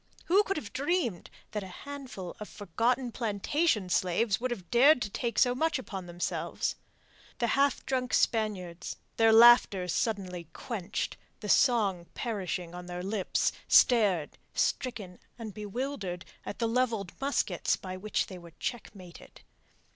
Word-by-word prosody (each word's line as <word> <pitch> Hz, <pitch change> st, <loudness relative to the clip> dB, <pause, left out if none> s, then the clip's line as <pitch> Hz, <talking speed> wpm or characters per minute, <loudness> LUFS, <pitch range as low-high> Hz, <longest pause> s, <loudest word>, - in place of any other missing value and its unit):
Who 380 Hz, +4 st, +5 dB
could 390 Hz, -1 st, -2 dB
have 225 Hz, -9 st, -6 dB
dreamed 280 Hz, -, -1 dB, 0.2 s
that 210 Hz, -, -2 dB
a 190 Hz, -, -7 dB, 0.2 s
handful 265 Hz, -11 st, -7 dB
of 210 Hz, -, -7 dB
forgotten 235 Hz, +6 st, -1 dB
plantation 225 Hz, -, 0 dB
slaves 190 Hz, +4 st, +1 dB
would 255 Hz, -, 0 dB
have 195 Hz, -8 st, -6 dB
dared 265 Hz, +4 st, +6 dB
to 205 Hz, -, -5 dB
take 235 Hz, 0 st, -3 dB
so 245 Hz, -, +5 dB
much 320 Hz, +5 st, +1 dB
upon 195 Hz, -8 st, -7 dB
themselves? 175 Hz, 0 st, -2 dB, 0.6 s
The 240 Hz, -, +1 dB
half 275 Hz, +4 st, +2 dB
drunken 255 Hz, -1 st, 0 dB
Spaniards, 190 Hz, -6 st, -1 dB, 0.2 s
their 225 Hz, -1 st, +5 dB
laughter 225 Hz, -5 st, +7 dB
suddenly 180 Hz, -3 st, -2 dB
quenched, 205 Hz, -5 st, -4 dB, 0.2 s
the 210 Hz, -, -5 dB
song 200 Hz, -10 st, +3 dB
perishing 185 Hz, -7 st, -3 dB
on 180 Hz, 0 st, -8 dB
their 180 Hz, 0 st, -5 dB
lips, 195 Hz, -1 st, 0 dB, 0.2 s
stared, 200 Hz, -, +4 dB, 0.2 s
stricken 210 Hz, -8 st, -1 dB, 0.2 s
and 225 Hz, -3 st, -7 dB
bewildered 210 Hz, -4 st, -4 dB, 0.2 s
at -, -, -5 dB
the 230 Hz, -, 0 dB
levelled 225 Hz, -6 st, 0 dB
muskets 280 Hz, +1 st, +1 dB
by 185 Hz, -1 st, -7 dB
which 210 Hz, +3 st, -1 dB
they 185 Hz, -2 st, -9 dB
were 170 Hz, -1 st, -13 dB
checkmated. 195 Hz, -7 st, -7 dB
215 Hz, 140 wpm, -30 LUFS, 185-250 Hz, 0.6 s, laughter